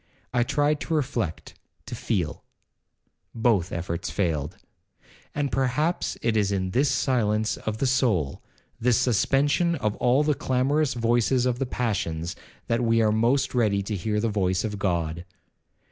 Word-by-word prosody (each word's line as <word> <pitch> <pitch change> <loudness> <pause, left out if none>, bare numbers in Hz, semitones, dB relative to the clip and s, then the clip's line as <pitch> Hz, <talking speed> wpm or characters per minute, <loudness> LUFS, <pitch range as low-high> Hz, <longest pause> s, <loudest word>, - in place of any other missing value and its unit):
I 120 - +2
tried 145 +4 +1
to 165 - -2
reflect, 125 - -2 0.3
to - - -8
feel,—both 95 +1 -3
efforts 85 0 -3
failed; 80 -7 -2 0.8
and 145 -1 -1
perhaps 135 +6 0
it 115 -1 +1
is 100 -2 +2
in 95 -2 -1
this 135 +7 +2
silence 110 -4 +1
of 110 0 -4
the 135 - 0
soul, 110 - +1 0.4
this 120 -1 +3
suspension 135 - +2
of 105 -8 -1
all 125 +4 +3
the 150 0 +2
clamorous 135 +2 0
voices 120 +2 +2
of 125 -1 0
the 135 - -1
passions, 90 -9 -2 0.3
that 115 +1 0
we 115 0 +3
are 110 - +3
most 120 +5 +1
ready 105 -5 +2
to 105 +2 -3
hear 105 +3 -1
the 115 - 0
voice 95 -4 0
of 105 -2 -4
God. 85 -3 -1
115 Hz, 145 wpm, -25 LUFS, 100-130 Hz, 0.8 s, this